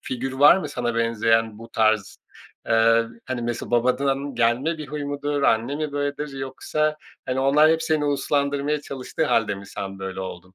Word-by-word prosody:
figür 130 +1 -4
var 145 +6 +7
mı 155 -6 -3
sana 120 -4 -2
benzeyen 115 -1 +1
bu 115 - -11
tarz? 110 -3 +1 0.5
Eee, 115 +1 +4 0.2
hani, 130 -2 -3
mesela, 120 0 -4
babadan 135 +3 +1
gelme 125 +8 +1
bir 150 - -6
huy 150 0 -4
mudur, 145 0 -2
anne 115 +3 +2
mi 155 -1 -3
böyledir 145 +1 -2
yoksa, 150 +3 -2 0.3
hani, 130 +1 -1
onlar 150 +4 +5
hep 160 0 +1
seni 155 -2 0
uslandırmaya 145 0 0
çalıştığı 140 +3 -4
hâlde 115 -7 +1
mi 100 0 -10
sen 95 0 -6
böyle 95 0 -5
oldun? 95 0 -8
130 Hz, 170 wpm, -23 LUFS, 115-145 Hz, 0.5 s, var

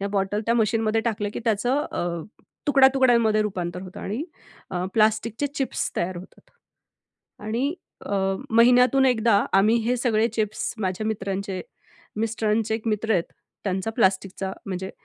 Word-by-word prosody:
ह्या 200 - -2
बॉटल 200 +1 -1
त्या 230 - +3
मशीनमध्ये 225 -1 +1
टाकलं 215 -3 -1
की - - -3
त्याचं 245 +6 +1
अ, 170 -1 -2 0.4
तुकड्या-तुकड्यांमध्ये 260 -6 +4
रुपांतर 180 -3 -4
होतं 185 -1 -9
आणि 225 +10 -3 0.5
अ, 180 -1 -2
प्लास्टिकचे 220 +4 +2
चिप्स 270 -3 -2
तयार 180 +1 -1
होतात 180 +2 -13 0.9
आणि 245 +8 -1 0.3
अ, - - -2 0.4
महिन्यातून 250 +3 +5
एकदा 225 -4 +3
आम्ही 210 +4 +5
हे 250 - +2
सगळे 230 -2 +2
चिप्स 215 -2 -2
माझ्या 190 +2 -2
मित्रांचे, 195 -3 -3 0.6
मिस्टरांचे 220 0 0
एक 225 0 -5
मित्र 220 +1 0
आहेत, 175 -4 +2 0.4
त्यांचा 190 +2 -1
प्लास्टिकचा 190 -2 0
म्हणजे 190 -1 -4
215 Hz, 135 wpm, -24 LUFS, 195-235 Hz, 0.9 s, महिन्यातून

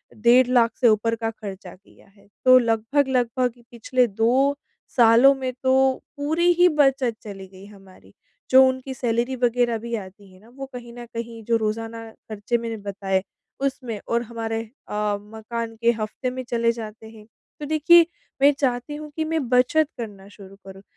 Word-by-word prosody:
डेढ़ 240 +3 +4
लाख 240 -2 +3
से 240 - +6
ऊपर 225 +1 +1
का 225 0 -3
खर्चा 195 -4 -9
किया 195 +2 -23
है, 200 0 -25 0.2
तो 255 0 +8
लगभग-लगभग 250 +1 0
कि 240 - -22
पिछले 245 +1 +1
2 240 +7 +2 0.4
सालों 235 +3 +7
में 260 -1 -3
तो 260 0 +3 0.4
पूरी 320 +5 +2
ही 355 +1 +5
बचत 270 -6 +2
चली 195 -2 -9
गई 190 +1 -15
हमारी। 195 -2 -17 0.4
जो 260 0 +8
उनकी 260 +1 -3
सैलरी 240 +1 -1
वगैरह 240 -1 +1
भी 235 +1 -5
आती 195 -1 -10
है 185 - -18
ना, 220 +4 -20
वो 270 +3 -8
कहीं 240 -1 -9
न 240 0 -9
कहीं 230 -1 -6
जो 230 0 +2
रोज़ाना 225 +1 -4
खर्चे 215 +2 -4
मैंने 230 -1 -5
बताए 195 -2 -2 0.4
उसमें 255 -5 -3
और 235 0 0
हमारे 225 -1 -4 0.3
अ, 210 -1 -1
मकान 225 +2 -6
के 235 - +4
हफ्ते 220 +4 -3
में 255 +1 -6
चले 230 -1 +1
जाते 220 -1 -9
हैं। 220 -1 -15 0.3
तो 295 - -5
देखिए, 315 +3 +5 0.4
मैं 285 +1 +7
चाहती 255 +1 -1
हूँ 300 0 -9
कि 315 - -2
मैं 315 -4 -2
बचत 255 +5 +3
करना 205 -5 -8
शुरू 195 -1 -14
करूँ 195 0 -11
235 Hz, 175 wpm, -23 LUFS, 215-255 Hz, 0.4 s, तो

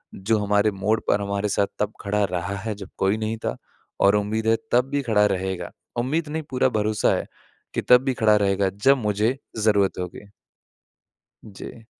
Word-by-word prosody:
जो 110 +4 0
हमारे 105 +1 +2
मोड़ 100 +3 0
पर 100 - +3
हमारे 100 +1 -2
साथ 100 0 +1
तब 105 +1 -1
खड़ा 105 +1 0
रहा 90 +2 -2
है 110 - -1
जब 95 - -8
कोई 95 +2 +1
नहीं 110 +1 -3
था। 60 - -1 0.5
और 100 +1 +5
उम्मीद 105 +2 -1
है 115 - +5 0.2
तब 125 +2 +3
भी 145 - 0
खड़ा 105 -4 +3
रहेगा 95 -2 -3 0.3
उम्मीद 150 +7 -1
नहीं 160 +1 -3
पूरा 130 0 +2
भरोसा 105 0 +1
है - - -3 0.5
कि - - -1
तब 125 +1 +5
भी 135 - +1
खड़ा 105 -1 +6
रहेगा 100 -1 +1 0.2
जब 135 +1 +6
मुझे 110 +2 0 0.2
ज़रूरत 105 -4 +2
होगी। 90 +3 -7 1.1
जी। 110 +2 -11
105 Hz, 180 wpm, -23 LUFS, 100-115 Hz, 1.1 s, खड़ा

